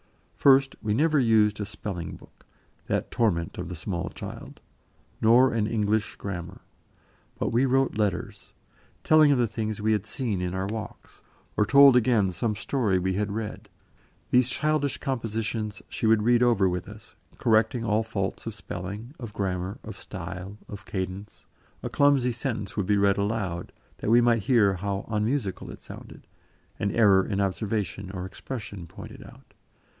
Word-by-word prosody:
First, 135 -1 +5
we 105 -1 0
never 155 +3 +3
used 110 -3 +3
a - - -1
spelling 95 -4 -5
book - - -19 0.4
that - - -1
torment 85 -9 0
of 90 -1 -5
the 90 - -5
small 90 +1 -3
child - - -9 0.6
nor 120 +3 +5
an 110 -2 +1
English 110 -1 0
grammar. 90 -1 -6 0.8
But - - -1
we 125 +4 +3
wrote 135 -3 +1
letters, 100 -4 -2 0.5
telling 155 -2 +6
of 140 - +3
the 120 - +3
things 110 -1 -3
we 110 +1 +1
had 105 -1 0
seen 110 -5 -2
in 90 0 -2
our 95 0 -1
walks, 110 +1 -7 0.3
or 105 - +2
told 140 0 +8
again 115 -6 +3
some 105 +5 -1
story 105 -2 0
we 95 +1 0
had 105 +1 -1
read; 110 0 -5 0.6
these 125 0 +4
childish 145 -1 0
compositions 115 -5 -3
she 110 - -2
would 110 -1 +4
read 120 +1 +4
over 115 -6 +4
with 90 +1 -3
us, 105 0 -13 0.2
correcting 115 +2 +2
all 105 0 +2
faults 110 -2 -3
of 115 - -4
spelling, 100 +6 -7
of 115 -5 -7
grammar, 95 +1 -2
of 110 -1 -8
style, 95 +1 -7
of 100 -2 -9
cadence; 95 +2 -5 0.4
a - - -3
clumsy 140 -3 +3
sentence 110 -5 -4
would 100 -3 -1
be 105 - +3
read 100 0 +3
aloud, 100 -4 -2 0.3
that - - -2
we 120 +2 +6
might 120 -2 +3
hear 105 -2 +4
how 100 +2 -3
unmusical 105 0 -1
it - - -9
sounded, - - -11 0.5
an 100 - 0
error 100 -4 +5
in 100 0 -2
observation 100 0 -2
or 95 -1 -5
expression 100 -3 -7
pointed - - -11
out. - - -16
105 Hz, 165 wpm, -26 LUFS, 95-120 Hz, 0.8 s, told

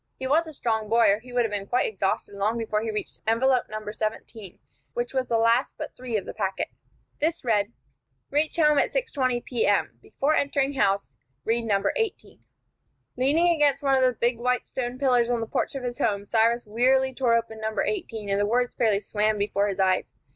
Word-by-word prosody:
He 260 - -5
was 315 +5 +2
a 315 - -8
strong 220 -5 -1
boy, 230 -2 +5
or 205 - +1
he 250 +2 -14
would 245 0 +2
have 220 - -3
been 200 -1 -3
quite 250 - +1
exhausted 195 -1 -2
long 205 +3 -1
before 215 -2 -1
he 225 - -3
reached 210 -1 -5
envelope 250 +3 +3
No. 215 0 -6
17, 215 -2 -5 0.4
which 240 +1 -2
was 260 -1 0
the 230 - +2
last 230 +3 +2
but - - -7
three 245 -3 -3
of 200 - -4
the - - -6
packet. 190 0 -2 0.5
This 320 -1 -1
read: 210 -2 +1 0.6
"Reach 300 +2 +1
home 300 -3 +4
at - - +1
6:20 265 - -1
P.M. 220 -5 0
Before 290 +3 -1
entering 280 -1 +1
house, 195 - 0 0.3
read 230 +1 0
No. 200 -3 +1
18." 450 -5 -3 0.8
Leaning 295 +7 +3
against 290 -3 +2
one 275 -1 +3
of 265 - +4
the 255 -2 +2
big 235 0 +1
white 250 +1 0
stone 245 -1 -4
pillars 250 -3 +2
of 240 -1 +1
the 225 - -2
porch 225 - -2
of 270 - -4
his 245 -1 -4
home, 200 -2 0
Cyrus 230 +2 +2
wearily 260 +5 +2
tore 245 -2 +2
open 225 -1 -3
envelope 220 0 -1
No. - - +1
18, 225 - -6
and 200 0 +1
the 205 - +1
words 245 +2 +1
fairly 210 -3 +1
swam 215 +1 0
before 205 0 0
his 195 -1 -3
eyes. 185 -1 +1
235 Hz, 210 wpm, -25 LUFS, 215-260 Hz, 0.8 s, boy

